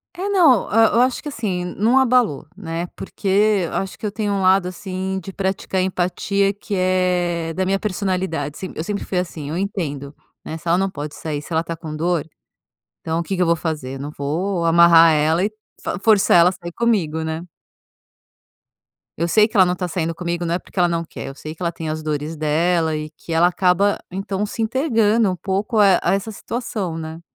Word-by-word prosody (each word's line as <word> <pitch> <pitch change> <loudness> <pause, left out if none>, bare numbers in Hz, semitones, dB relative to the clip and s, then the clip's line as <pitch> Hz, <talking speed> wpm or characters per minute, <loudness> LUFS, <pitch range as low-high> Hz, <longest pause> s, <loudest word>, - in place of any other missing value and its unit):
É, 380 +3 -3
não, 325 - +4
hã, 225 +2 +5
eu 235 - +3
acho 255 -1 0
que, 300 - -6
assim, 195 -9 -3
não 215 +8 +1
abalou, 250 - +3
né, 170 -2 -4
porque 200 - -6 0.4
eu - - -8
acho 195 -1 -3
que - - -12
eu 210 - 0
tenho 205 -2 -1
lado 185 0 +4
assim 190 +1 -4
de 195 +2 -9
praticar 190 0 -2
empatia 190 +2 0
que 205 0 -6
é 180 -2 +1
da 185 - 0
minha 195 +1 +1
personalidade 185 -7 -2
se 185 - -6
eu 155 - -3
sempre 205 +3 -3
fui 185 - -2
assim, 155 -5 -6
eu 160 - -3
entendo, 155 -8 -3 0.3
né. 160 - -5
Se 170 - -20
ela 170 +1 +3
não 195 +1 0
pode 150 -2 -6
sair, 150 -2 -4
se 155 - -10
ela 160 +1 +2
tá 165 0 -5
com 155 -2 -7
dor, 170 -1 -1 0.7
então 160 +1 -2
o 170 - -2
que 195 - -3
que 180 - 0
eu - - +3
vou 170 0 +3
fazer? 150 -5 -4
Eu - - -7
não 145 +2 -5
vou 170 +5 -1
amarrar 165 -1 +7
ela 155 +3 +2
e 205 - 0 0.3
f 175 - -2
forçar 205 -4 +4
ela 170 +1 +6
a - - -6
sair 175 -1 -8
comigo, 170 -9 0
né? 160 +1 -3 1.8
Eu 170 - 0
sei 215 +4 +4
que 220 - -6
ela 185 - +7
não 180 - +1
tá 180 0 -3
saindo 165 -1 -2
comigo 175 0 -3
não 170 0 0
é - - 0
porque - - -11
ela 175 -1 +4
não 170 0 -1
quer, - - -8
eu 135 - -8
sei 155 +2 -8
que 180 - -11
ela 170 0 0
tem 165 -1 -6
as 155 0 -3
dores 155 +1 -3
dela 160 +1 +1
e 155 0 -5
que 165 +1 -10
ela 170 +2 +5
acaba 185 +2 +2
então 195 +2 -3
se 225 - -4
entegando 225 -4 +2
um 180 - -3
pouco 200 +4 -1
a 195 -3 +6
a - - +2
essa 200 +3 -2
situação, 210 -6 -4
né? 160 0 -6
180 Hz, 220 wpm, -21 LUFS, 165-200 Hz, 1.8 s, amarrar